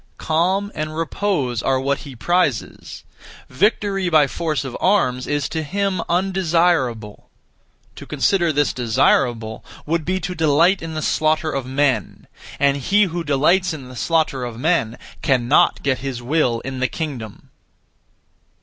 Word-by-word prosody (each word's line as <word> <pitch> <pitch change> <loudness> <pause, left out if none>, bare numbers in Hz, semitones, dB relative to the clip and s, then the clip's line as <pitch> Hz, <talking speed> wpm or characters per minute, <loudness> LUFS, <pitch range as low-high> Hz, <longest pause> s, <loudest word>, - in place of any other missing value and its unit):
Calm 185 +6 0
and 155 +1 -4
repose 165 - -1
are 135 0 +1
what 140 +1 -1
he 140 -3 -10
prizes; 150 -2 -1 0.5
victory 195 - +1
(by 155 -3 +5
force 155 0 -2
of 130 - -6
arms) 130 -11 +1
is 145 -1 -1
to 160 - -2
him 190 +3 -1
undesirable. 170 - 0 0.7
To - - -10
consider 175 -4 +1
this 145 -2 +1
desirable 115 -1 +1 0.2
would 165 +1 -1
be 185 +4 -1
to 180 +2 -4
delight 165 +3 +3
in 160 -1 -6
the 155 - -3
slaughter 155 0 +1
of 135 -2 -3
men; 135 0 -1 0.3
and 140 0 +3
he 200 +10 +2
who 175 -3 -2
delights 165 +5 +2
in 130 -4 -10
the 130 - -11
slaughter 155 -1 0
of 120 -2 -6
men 125 -5 0 0.2
cannot 130 -1 +2
get 135 -2 0
his 135 -3 -4
will 125 -2 0
in 130 0 -6
the 130 - +1
kingdom. 125 -8 -7
155 Hz, 145 wpm, -20 LUFS, 130-175 Hz, 0.7 s, by